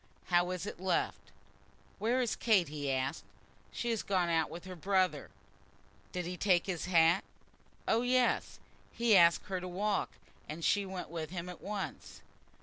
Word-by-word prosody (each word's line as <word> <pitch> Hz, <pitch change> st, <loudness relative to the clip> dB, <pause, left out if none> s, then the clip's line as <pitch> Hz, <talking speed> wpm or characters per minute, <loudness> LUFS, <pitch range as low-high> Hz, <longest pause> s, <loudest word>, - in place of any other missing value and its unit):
How 175 Hz, +1 st, +4 dB
is 185 Hz, 0 st, -3 dB
it 205 Hz, -, -6 dB
left?" 185 Hz, 0 st, -1 dB, 0.7 s
"Where 240 Hz, +4 st, +1 dB
is 235 Hz, -, -1 dB
Kate?" 200 Hz, -9 st, +3 dB
he 145 Hz, -2 st, -3 dB
asked. 135 Hz, +3 st, -1 dB, 0.5 s
"She 240 Hz, -, -2 dB
has 225 Hz, -, 0 dB
gone 185 Hz, -3 st, +1 dB
out 165 Hz, -2 st, +2 dB
with 170 Hz, +2 st, -9 dB
her 185 Hz, -1 st, -7 dB
brother." 185 Hz, +1 st, +1 dB, 0.8 s
"Did 180 Hz, -2 st, -3 dB
he 180 Hz, +1 st, -5 dB
take 180 Hz, -2 st, +3 dB
his 180 Hz, -4 st, -3 dB
hat?" 170 Hz, 0 st, +4 dB, 0.6 s
"Oh, 225 Hz, -, +3 dB
yes. 250 Hz, 0 st, +1 dB, 0.3 s
He 235 Hz, -2 st, +3 dB
asked 170 Hz, -2 st, +6 dB
her 190 Hz, -2 st, -3 dB
to 180 Hz, -, -5 dB
walk, 200 Hz, +3 st, -1 dB, 0.4 s
and 160 Hz, +2 st, -4 dB
she 200 Hz, -1 st, +2 dB
went 185 Hz, -1 st, -6 dB
with 160 Hz, -2 st, -4 dB
him 175 Hz, 0 st, -5 dB
at 180 Hz, -, -9 dB
once." 200 Hz, 0 st, -6 dB
185 Hz, 165 wpm, -33 LUFS, 170-205 Hz, 0.8 s, asked